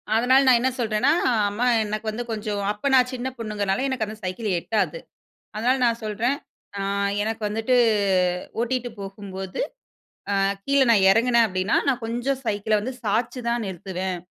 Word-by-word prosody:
அதனால 255 +4 +5
நான் 245 -2 +6
என்ன 260 - +2
சொல்றேன்னா, 225 +3 +2 0.2
அ - - +2 0.2
அம்மா 215 +5 -1 0.2
எனக்கு 215 +1 -4
வந்து 230 +3 -4
கொஞ்சம் 210 -2 -3
அப்ப 210 0 -9
நான் 255 -1 +4
சின்னப் 255 +1 -5
பொண்ணுங்கறதுனால. 210 +1 -1
எனக்கு 255 -4 -1
அந்தச் 215 0 -10
சைக்கிள் 190 +2 -2
ஏட்டாது. 220 - -1 0.6
அதனால 245 +4 +2
நான் 230 -1 +1
சொல்றேன். 225 +6 0 0.4
"ஆ. - - -3 0.4
எனக்கு 220 +1 -3
வந்துட்டு 225 +4 +1 0.9
ஓட்டிட்டு 245 0 -2
போகும்போது, 195 -1 -6 0.8
அ - - +2 0.2
கீழ 280 0 +2
நான் 205 -4 +5
இறங்குனேன் 235 +2 +4
அப்டின்னா 185 +2 0
நான் 255 -3 +1
கொஞ்சம் 245 +4 -2
சைக்கிள 210 0 +1 0.2
சாச்சி 230 +4 -1
தான் 235 -1 0
நிறுத்துவேன். 185 0 -4
225 Hz, 150 wpm, -24 LUFS, 205-245 Hz, 0.9 s, நான்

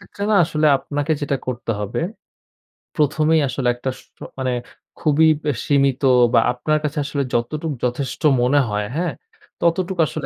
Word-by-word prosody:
এক্ষেত্রে 195 +2 -10
না - - +4
আসলে 155 -1 0
আপনাকে 145 +2 -2
যেটা 140 -1 -1
করতে 120 -2 -3
হবে, 105 +1 -3 1.0
প্রথমেই 155 +1 +2
আসলে 130 -1 -2
একটা 125 +2 -4
শ - - -15 0.4
মানে 130 -1 -1 0.5
খুবই 155 0 +3 0.2
ব্যা 150 -2 0
সীমিত 140 -2 +2 0.3
বা - - +6
আপনার 155 +5 0
কাছে 150 0 -3
আসলে 140 -1 -2
যতটুক 150 +6 -1
যথেষ্ট 125 +2 -2 0.2
মনে 135 +4 +3
হয় 105 0 -2
হ্যাঁ? 170 +1 -1 0.5
ততটুক 180 +2 0
আসলে - - -5
145 Hz, 150 wpm, -20 LUFS, 130-155 Hz, 1.0 s, বা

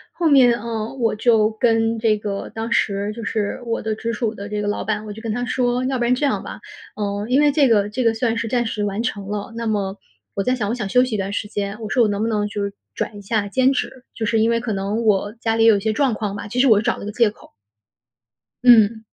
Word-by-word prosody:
后 335 -3 +1
面， 255 -4 +6
嗯， 230 +2 -4
我 225 -2 +1
就 220 -1 +3
跟 225 0 +1
这 220 -1 +2
个 200 -1 -4
当 225 +1 -4
时 200 -2 0
就 230 0 -7
是 210 +2 -2
我 230 -1 -2
的 220 0 -2
直 230 +1 -3
属 225 0 -2
的 200 +1 -7
这 210 0 -3
个 205 - -2
老 205 - -2
板， 215 +1 -2
我 210 - -6
就 220 - -9
跟 225 - -2
他 245 +2 -2
说： 245 0 0
“要 265 - -1
不 240 - -1
然 240 - +3
这 255 +4 -2
样 280 - 0
吧， - - -8 0.4
呃， 205 0 -3
因 270 +3 +4
为 295 - +4
这 285 -2 +3
个 205 -3 +3
这 245 +4 -2
个 230 - +3
算 225 0 -1
是 230 0 -2
暂 240 +1 +1
时 210 -2 -2
完 205 +2 -2
成 205 -4 -3
了， 205 +1 -4
那 230 - -4
么 200 -3 -1 0.4
我 195 - 0
在 255 0 +1
想， 210 -5 -2
我 230 - -1
想 215 -5 -4
休 250 +5 +4
息 250 -4 -2
一 - - -1
段 195 +1 -3
时 205 - -3
间。” 205 +1 -4
我 215 - -5
说： 245 0 +3
“我 - - +3
能 205 0 -2
不 225 - +1
能 210 -2 0
就 205 0 -4
是 200 - -2 0.2
转 205 - -4
一 - - -9
下 205 0 -1
兼 260 +5 +2
职， 260 -2 -4
就 225 - -5
是 225 +1 +1
因 225 +1 +3
为 230 - +1
可 230 -1 -4
能 205 +3 -2
我 205 -1 +1
家 225 -1 0
里 225 - +3
也 225 - +7
有 210 - +3
一 - - -2
些 220 +2 0
状 265 +1 +1
况 210 -2 -3
吧。” 200 - -6
其 245 +4 -3
实 270 - +5
我 220 - +6
是 210 - 0
找 235 - 0
了 - - -8
个 210 - -4
借 225 -1 +2
口。 - - -19 1.1
嗯。 225 -2 +6
220 Hz, 305 characters per minute, -21 LUFS, 205-235 Hz, 1.1 s, 也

